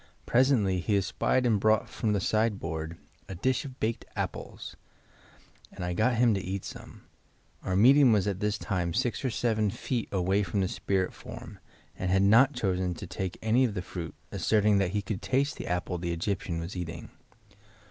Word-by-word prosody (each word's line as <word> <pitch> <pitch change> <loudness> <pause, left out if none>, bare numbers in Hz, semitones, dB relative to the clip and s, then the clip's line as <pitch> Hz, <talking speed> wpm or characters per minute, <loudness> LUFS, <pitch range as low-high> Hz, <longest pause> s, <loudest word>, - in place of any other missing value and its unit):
Presently 120 -8 +3
he 100 +4 +1
espied 125 +6 +1
and 110 -4 +3
brought 110 +1 +3
from 110 -3 -1
the 100 - +1
side 110 +1 +1
board 80 +1 -4 0.3
a 95 - -5
dish 130 - 0
of 130 -2 -9
baked 110 +1 -1
apples - - -5 1.0
and 90 - -6
I 90 - -2
got 110 +6 +2
him 115 -1 +4
to 100 - -1
eat 95 +1 -4
some. - - -10 0.6
Our 95 - -2
medium 130 +5 +6
was 105 -4 +3
at 100 -2 -2
this 105 0 0
time 90 -6 -2
six 125 0 0
or 130 - +1
seven 110 -3 +1
feet 115 +2 -3
away 95 +1 +1
from 100 +1 -1
the 95 - +1
spirit 95 0 -1
form - - -10 0.4
and 95 - -3
had 95 +1 +3
not 120 +8 +6
chosen 95 -5 -1
to - - -7
take 95 -2 -4
any 115 +4 +3
of 115 -5 0
the 90 - -3
fruit, 85 -3 -6 0.2
asserting 105 -2 +3
that 95 -2 +1
he 105 -1 0
could 100 -2 -4
taste 140 +2 0
the - - -6
apple 90 0 -2
the 85 0 -2
Egyptian 85 -1 -2
was 85 +3 -6
eating. 85 -3 -6
100 Hz, 190 wpm, -29 LUFS, 90-115 Hz, 1.0 s, medium